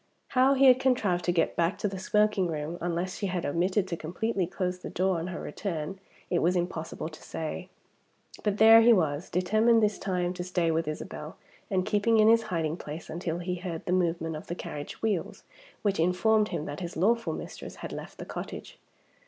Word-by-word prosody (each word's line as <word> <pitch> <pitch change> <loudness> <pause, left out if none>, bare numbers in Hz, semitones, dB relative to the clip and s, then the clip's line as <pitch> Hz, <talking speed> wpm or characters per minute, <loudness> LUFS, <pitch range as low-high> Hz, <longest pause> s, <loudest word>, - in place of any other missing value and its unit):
How 265 +1 +4
he 275 +1 +5
had 255 -1 +7
contrived 220 -9 +1
to 175 - +3
get 170 -2 +1
back 170 +2 +1
to - - -1
the 195 -1 -5
smoking 210 -1 +2
room 155 +1 -4
(unless 175 +2 -2
she 200 - -2
had 180 -2 -2
omitted 185 +5 +1
to 175 - -2
completely 185 +4 -2
close 180 0 -3
the - - -7
door 185 -1 +1
on 165 - -4
her 185 - -5
return) 190 -1 -4 0.3
it 175 - +3
was 180 +2 +2
impossible 170 -3 -3
to 155 -1 -11
say. 165 +3 -5 0.7
But 210 -1 0
there 225 +1 +9
he 235 +1 +7
was, 160 -4 0
determined 220 +5 +3
this 210 -1 +1
time 180 -2 -1
to 180 -1 -5
stay 175 -2 0
with 160 0 0
Isabel, 155 - -6 0.3
and 185 -3 +1
keeping 215 +2 +2
in 215 0 +6
his 230 0 +6
hiding 165 -2 -1
place 155 +1 -7
until 170 0 -3
he 180 +1 -3
heard 175 -2 -5
the - - -2
movement 165 -3 0
of 155 - -8
the 175 - -3
carriage 150 -1 -7
wheels, 205 -6 -1 0.4
which 200 -4 +1
informed 210 +6 +3
him 150 - -3
that 145 -1 -5
his 170 -3 -6
lawful 230 +6 +2
mistress - - -7
had - - -6
left - - -8
the - - -7
cottage! - - -7
180 Hz, 200 wpm, -28 LUFS, 170-210 Hz, 0.7 s, there